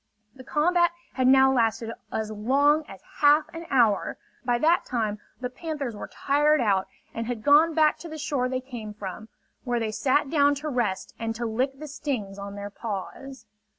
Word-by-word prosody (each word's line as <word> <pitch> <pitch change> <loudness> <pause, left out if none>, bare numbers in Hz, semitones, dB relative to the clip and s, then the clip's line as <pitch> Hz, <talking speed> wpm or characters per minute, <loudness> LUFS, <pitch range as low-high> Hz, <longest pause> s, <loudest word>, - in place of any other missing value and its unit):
The 260 - -12
combat 345 +5 +2 0.2
had 255 -1 +1
now 265 0 +6
lasted 230 -2 +1 0.2
as 215 -1 -3
long 280 +8 +2
as 195 - -12 0.2
half 295 +1 +6
an 330 0 -7
hour. 230 -7 +2 0.3
By 245 -1 +1
that 330 +7 +3
time 215 -4 -2 0.2
the 250 0 -3
panthers 285 -4 -4
were - - -7
tired 295 +2 +2
out 200 -5 +1 0.3
and 230 0 -4
had 240 -3 -4
gone 300 +3 +5
back 310 -1 +3
to 340 - -8
the 315 - -7
shore 280 -4 -1
they 255 0 -2
came 235 -5 -8
from, 210 +2 -7 0.3
where 245 -2 -1
they 220 -1 -2
sat 270 +6 +1
down 285 -2 +4
to 300 +2 -4
rest 235 -8 -2
and 225 -1 -3
to 235 +1 -3
lick 255 +5 -1
the 305 +2 -8
stings 240 -9 -4
on 200 0 -7
their 205 0 -6
paws. 230 +6 -6
255 Hz, 185 wpm, -26 LUFS, 220-290 Hz, 0.3 s, now